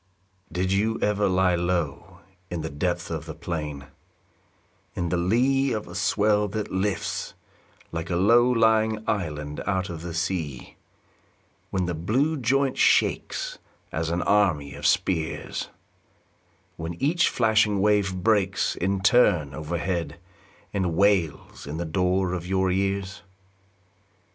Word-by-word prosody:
Did 95 Hz, +1 st, -1 dB
you 110 Hz, +3 st, +1 dB
ever 105 Hz, -1 st, +1 dB
lie 90 Hz, 0 st, +3 dB
low 85 Hz, +1 st, -2 dB, 0.3 s
In 85 Hz, -2 st, -3 dB
the 80 Hz, -1 st, -5 dB
depth 85 Hz, +3 st, -2 dB
of 80 Hz, -1 st, -4 dB
the 80 Hz, -, -6 dB
plain, 75 Hz, -5 st, -5 dB, 0.6 s
& -, -, -39 dB
In 85 Hz, -1 st, -2 dB
the 90 Hz, -, 0 dB
lee 130 Hz, +9 st, +2 dB
of 105 Hz, -1 st, -4 dB
a 85 Hz, -, -10 dB
swell 105 Hz, +3 st, +2 dB
that 105 Hz, +1 st, -4 dB
lifts 95 Hz, +1 st, -2 dB, 0.6 s
Like 80 Hz, +1 st, -4 dB
a 85 Hz, -, 0 dB
low 115 Hz, +7 st, +5 dB
lying 110 Hz, -2 st, +2 dB
island 75 Hz, -7 st, -2 dB
out 95 Hz, -2 st, -1 dB
of 80 Hz, -2 st, -7 dB
the 85 Hz, -1 st, -6 dB
sea, 85 Hz, -6 st, -3 dB, 0.9 s
When 95 Hz, -1 st, -1 dB
the 90 Hz, -, -2 dB
blue 120 Hz, -, 0 dB
joint 135 Hz, 0 st, +1 dB
shakes -, -, +1 dB, 0.3 s
As 80 Hz, 0 st, -2 dB
an 85 Hz, +1 st, -1 dB
army 85 Hz, -10 st, +2 dB
of 70 Hz, +1 st, -1 dB
spears; 80 Hz, -4 st, -1 dB, 1.1 s
When 80 Hz, +1 st, -5 dB
each 165 Hz, -, +2 dB
flashing 110 Hz, -3 st, +2 dB
wave 100 Hz, -2 st, +2 dB
breaks 100 Hz, -3 st, +2 dB
In 95 Hz, +1 st, -1 dB
turn 95 Hz, -, +4 dB
overhead 85 Hz, +4 st, -3 dB, 0.5 s
And 90 Hz, -5 st, 0 dB
wails 95 Hz, -8 st, +1 dB
in 75 Hz, +2 st, -5 dB
the 85 Hz, -, -3 dB
door 90 Hz, +2 st, +1 dB
of 90 Hz, -1 st, -4 dB
your 95 Hz, 0 st, +1 dB
ears 95 Hz, +1 st, -1 dB
95 Hz, 135 wpm, -25 LUFS, 85-105 Hz, 1.1 s, low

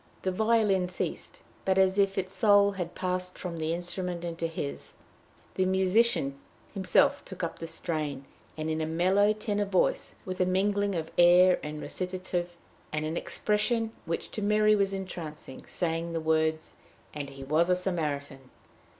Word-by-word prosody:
The 185 Hz, -, +1 dB
violin 210 Hz, -3 st, +2 dB
ceased, 180 Hz, -, -5 dB, 0.2 s
but, 190 Hz, 0 st, +1 dB
as 190 Hz, +1 st, +4 dB
if 195 Hz, 0 st, +2 dB
its 190 Hz, 0 st, -2 dB
soul 205 Hz, -1 st, +5 dB
had 180 Hz, -3 st, -5 dB
passed 180 Hz, 0 st, -2 dB
from 170 Hz, -3 st, -5 dB
the 160 Hz, 0 st, -1 dB
instrument 175 Hz, 0 st, -3 dB
into 165 Hz, -1 st, -2 dB
his, 70 Hz, -, -6 dB, 0.6 s
the 185 Hz, -, +1 dB
musician 190 Hz, -6 st, +2 dB, 0.3 s
himself 190 Hz, -3 st, +3 dB
took 190 Hz, -2 st, -8 dB
up 170 Hz, -, -3 dB
the 165 Hz, -, -5 dB
strain, 150 Hz, -5 st, -3 dB, 0.3 s
and 155 Hz, 0 st, -3 dB
in 160 Hz, 0 st, -1 dB
a 155 Hz, -, -1 dB
mellow 185 Hz, +6 st, +3 dB
tenor 210 Hz, -1 st, -1 dB
voice, 190 Hz, -2 st, 0 dB
with 185 Hz, 0 st, -3 dB
a -, -, +4 dB
mingling 200 Hz, +1 st, +1 dB
of 160 Hz, -1 st, -3 dB
air 180 Hz, +1 st, +7 dB
and 150 Hz, 0 st, -6 dB
recitative, 180 Hz, -1 st, -3 dB, 0.3 s
and 155 Hz, 0 st, -2 dB
an 155 Hz, +1 st, -3 dB
expression 220 Hz, +4 st, 0 dB, 0.2 s
which 165 Hz, -, -3 dB
to 215 Hz, -, -4 dB
Mary 210 Hz, +1 st, +4 dB
was 200 Hz, -1 st, +2 dB
entrancing, 170 Hz, -8 st, -7 dB
sang 165 Hz, -1 st, -2 dB
the 165 Hz, -, -1 dB
words, 160 Hz, 0 st, 0 dB, 0.4 s
"And 145 Hz, -2 st, -5 dB
he 135 Hz, 0 st, -10 dB
was 155 Hz, +6 st, +2 dB
a 180 Hz, -, +5 dB
Samaritan." 150 Hz, -7 st, -3 dB
180 Hz, 160 wpm, -29 LUFS, 160-195 Hz, 0.6 s, air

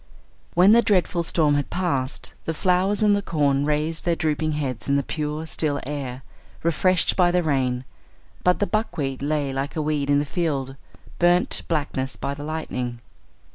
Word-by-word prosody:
When 180 Hz, +4 st, +7 dB
the 235 Hz, +2 st, +7 dB
dreadful 180 Hz, -5 st, +2 dB
storm 160 Hz, -3 st, +2 dB
had 145 Hz, -1 st, 0 dB
passed, 140 Hz, -8 st, -2 dB
the 160 Hz, -, -2 dB
flowers 185 Hz, +5 st, +2 dB
and 205 Hz, -1 st, +5 dB
the 205 Hz, -, 0 dB
corn 145 Hz, -6 st, +1 dB
raised 150 Hz, +2 st, 0 dB
their 170 Hz, -1 st, +1 dB
drooping 155 Hz, -1 st, 0 dB
heads 135 Hz, -4 st, -3 dB
in 140 Hz, -, +3 dB
the 140 Hz, -, +2 dB
pure 150 Hz, +1 st, -3 dB
still 155 Hz, -2 st, -1 dB
air, 135 Hz, -2 st, -5 dB, 0.4 s
refreshed 170 Hz, +3 st, +2 dB
by 180 Hz, -2 st, +4 dB
the 180 Hz, 0 st, +2 dB
rain, 130 Hz, -4 st, 0 dB, 0.6 s
but 180 Hz, 0 st, +4 dB
the 205 Hz, -, +1 dB
buckwheat 150 Hz, -, -2 dB
lay 145 Hz, -1 st, -1 dB
like 135 Hz, +2 st, -3 dB
a 155 Hz, -, 0 dB
weed 150 Hz, -2 st, -1 dB
in 145 Hz, -, +4 dB
the 145 Hz, -, +1 dB
field, 140 Hz, -5 st, -2 dB, 0.4 s
burnt 175 Hz, +1 st, +3 dB
to -, -, -2 dB
blackness 140 Hz, -4 st, -2 dB
by 140 Hz, -, -3 dB
the 145 Hz, +1 st, -7 dB
lightning. 125 Hz, -6 st, -4 dB
150 Hz, 175 wpm, -24 LUFS, 140-175 Hz, 0.6 s, When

